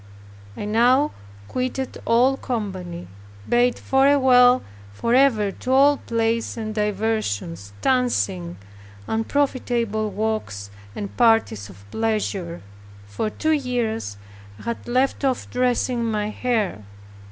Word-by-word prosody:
I - - -4
now 245 +7 +3 0.4
quitted 255 - -3
all 245 +4 +4
company, 190 -9 -5 0.4
bade 245 +1 +3
farewell 260 -2 +5 0.3
forever 230 - +2
to 255 - -5
all 280 +2 +5
plays 230 -1 -1
and 215 -1 -4
diversions, 200 - -2
dancing, 100 - 0 0.5
unprofitable 230 -3 0
walks 205 - -3 0.2
and 200 - -6
parties 225 - +2
of 100 +1 -15
pleasure. 200 - -2 0.4
For 100 - -3
two 315 +8 -1
years 240 - -1 0.4
I - - -13
had 235 0 -5
left 255 +4 +1
off 265 -2 0
dressing 250 -1 +1
my 215 -2 -1
hair. 215 - -1
225 Hz, 105 wpm, -23 LUFS, 205-250 Hz, 0.5 s, farewell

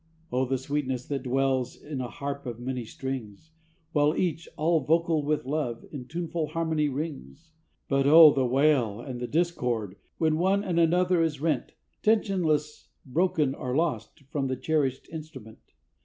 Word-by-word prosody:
O 130 +1 +1
the 135 +1 0
sweetness 130 -2 -2
that 140 -2 -2
dwells 130 -1 0
in 145 -3 -6
a 125 - -4
harp 140 +1 -5
of 120 -1 -5
many 125 -1 -4
strings, 130 +2 -6 0.4
While 150 +1 +3
each, 170 -2 -1
all 160 +2 +3
vocal 165 +2 +2
with 150 -2 -1
love, 130 -5 -2
in 130 -4 -7
tuneful 165 0 -3
harmony 160 -2 0
rings! 155 +2 -6 0.4
But 135 0 +2
O, 155 0 +9
the 135 - +1
wail 130 -5 +2
and 125 0 -6
the 125 - -3
discord, 125 - -1 0.2
when 160 -1 +1
one 195 +3 +2
and 175 -4 0
another 175 +1 +3
is 155 -4 0
rent, 160 +1 -1 0.3
Tensionless, 175 -9 +1 0.2
broken 155 0 +1
or 130 -2 -4
lost, 140 -8 -1
from 140 -2 -1
the 130 - -1
cherished 140 -3 -1
instrument. 150 -9 -9
145 Hz, 155 wpm, -27 LUFS, 130-160 Hz, 0.4 s, O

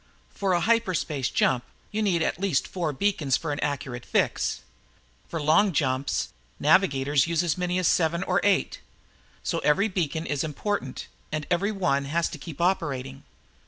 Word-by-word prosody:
For 195 -2 0
a 175 - +2
hyperspace 180 - +1
jump, 125 -2 +2 0.3
you 215 - -1
need 180 -6 +2
at 175 - -2
least 185 -9 +1
four 170 -5 -2
beacons 150 -4 +1
for 160 - -4
an 145 - -3
accurate 135 -4 -3
fix. - - 0 0.7
For 165 - -4
long 160 +6 +4
jumps, 130 -1 0 0.3
navigators 145 -3 +3
use 170 0 +1
as 170 -4 +1
many 180 0 -1
as 185 - +2
seven 170 +1 +2
or 185 0 +1
eight. 200 -2 +2 0.6
So - - -1
every 195 +9 +2
beacon 165 -4 -2
is 145 -3 -1
important 155 -2 -3 0.3
and 155 -1 -2
every 195 +4 +2
one 155 -9 0
has 165 +4 0
to 155 - -8
keep 160 0 -9
operating. 140 -7 -1
165 Hz, 160 wpm, -26 LUFS, 140-185 Hz, 0.7 s, long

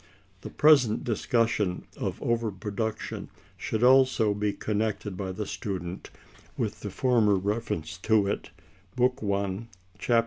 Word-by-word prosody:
The - - -7
present 140 -7 +4
discussion 110 -4 0
of - - -3
over 115 -2 0
production 105 +2 -4 0.3
should 110 +2 -2
also 130 -4 +5
be 105 0 0
connected 105 -2 -2
by 95 0 -4
the 105 +3 -4
student 90 -3 -5 0.5
with - - -2
the - - -5
former 115 -5 +3
reference 95 -6 -2
to 110 0 +3
it, 100 - -3 0.5
Book 125 +1 +2
I, 100 +1 -1 0.3
Chap. 115 +6 +3
105 Hz, 130 wpm, -27 LUFS, 100-115 Hz, 0.5 s, also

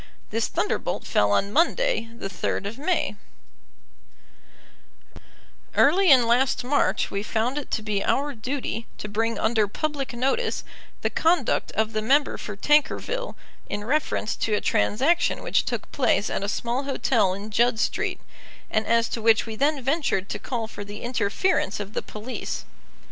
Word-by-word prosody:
This - - 0
thunderbolt - - -2
fell 105 - +2
on 200 - +1
Monday, 350 - +2
the - - -4
3rd 195 +1 -2
of 220 +5 -5
May: 305 - 0 2.6
Early 365 +6 +5
in 255 -4 +7
last 245 +3 +2
March 280 +4 +1
we 200 - -1
found 230 +6 -1
it 290 - -9
to 220 - -2
be 210 -2 -1
our 285 +1 +1
duty 235 -1 -4
to - - -5
bring 225 +2 -1
under 220 -1 +2
public 285 +4 -3
notice 270 - 0 0.4
the - - +1
conduct 335 +2 +1
of 220 +1 0
the 215 - 0
member 275 +6 +2
for 210 - -6
Tankerville 305 - +1 0.3
in 205 - -3
reference 260 -3 0
to 215 - 0
a - - +1
transaction 270 - +1
which - - +1
took - - -4
place - - +1
at - - -1
a 200 - -1
small 240 +5 -2
hotel 235 -8 +1
in 205 +2 -8
Judd 235 +1 +3
Street, - - -1 0.5
and 215 0 0
as 230 0 +3
to 230 - -3
which 225 0 +4
we 225 -1 -6
then 280 +2 +1
ventured 270 - 0
to - - -3
call 240 -4 -3
for 205 -2 -8
the 205 +1 -8
interference 235 - 0
of 205 +1 -6
the - - -1
police. 215 +4 -6
230 Hz, 160 wpm, -25 LUFS, 210-280 Hz, 2.6 s, in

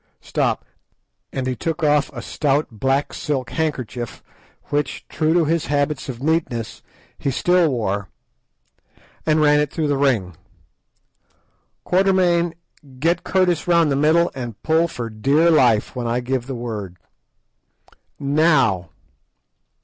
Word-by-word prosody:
Stop," - - -1 0.7
and 130 - -3
he 130 -1 -1
took 165 +6 -3
off 150 -1 +3
a 120 -4 -7
stout 145 +2 0
black 135 +5 0
silk 135 -6 -3
handkerchief, 130 -7 -3 0.5
which, 145 -1 -2
true 155 0 0
to 170 -2 +4
his 165 +1 0
habits 145 -1 -1
of 125 0 -6
neatness, 145 -8 -1 0.4
he - - -1
still 175 +5 +3
wore, 100 -6 -2 1.2
and 155 0 +3
ran 150 -1 +5
it 150 -1 0
through 160 -2 -1
the 140 -1 +1
ring. 110 - +1 1.5
"Quatermain, 180 -3 +2 0.4
get 165 +5 +1
Curtis 180 -4 +1
round 170 -3 +4
the - - +2
middle 160 +4 +3
and 120 -5 -6
pull 160 +1 +3
for 125 -8 -5
dear 140 +10 +2
life 125 -9 +3
when 120 -2 -3
I 120 +1 0
give 125 0 -2
the 135 - -4
word. 105 -6 -5 1.2
_Now. 140 - +2
145 Hz, 130 wpm, -21 LUFS, 120-160 Hz, 1.5 s, ran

